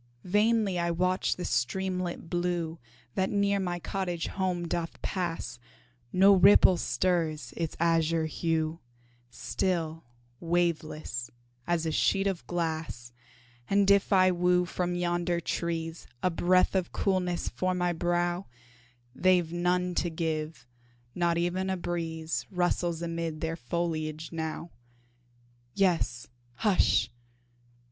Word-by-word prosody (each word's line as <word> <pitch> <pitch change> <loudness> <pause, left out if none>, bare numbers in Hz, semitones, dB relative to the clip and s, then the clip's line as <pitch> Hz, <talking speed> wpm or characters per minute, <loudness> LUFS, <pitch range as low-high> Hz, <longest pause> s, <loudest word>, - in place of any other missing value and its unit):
Vainly 210 -1 +2
I 170 0 0
watch 185 +2 +1
the 180 - -5
streamlet 180 +8 -1
blue 175 -1 -2 0.3
That 190 0 0
near 200 -1 +2
my 180 -2 -2
cottage 175 -1 -3
home 180 -3 -1
doth 165 0 -3
pass, 165 -10 -3 0.5
No 195 +2 +6
ripple 190 -1 +7
stirs 170 -5 0
its 165 -2 -3
azure 165 -1 +2
hue, 160 0 -1 0.5
Still 165 +2 -2 0.4
waveless, 165 -7 -1 0.4
as 170 -1 +1
a 160 - 0
sheet 195 +5 +2
of 195 -4 -2
glass 160 -8 -3 0.6
And 200 0 +4
if 200 +1 +3
I 185 -1 +5
woo 180 0 +2
from 175 0 -2
yonder 175 0 0
trees 165 -1 -3 0.2
A 185 - +3
breath 185 +2 +3
of 185 -2 0
coolness 180 -3 0
for 185 0 -1
my 180 -1 +1
brow, 175 +2 0 0.7
They've 180 -1 +2
none 180 +1 +1
to 175 - -2
give 160 -3 -3 0.5
not 170 -1 +1
e'en 180 +2 0
a 190 - 0
breeze 165 -2 -3
Rustles 175 -2 0
amid 165 -2 -3
their 165 0 -1
foliage 160 0 -3
now; 160 +1 -4 1.0
Yes, 165 -11 +1 0.3
hush! 150 - +2
175 Hz, 120 wpm, -29 LUFS, 165-185 Hz, 1.0 s, ripple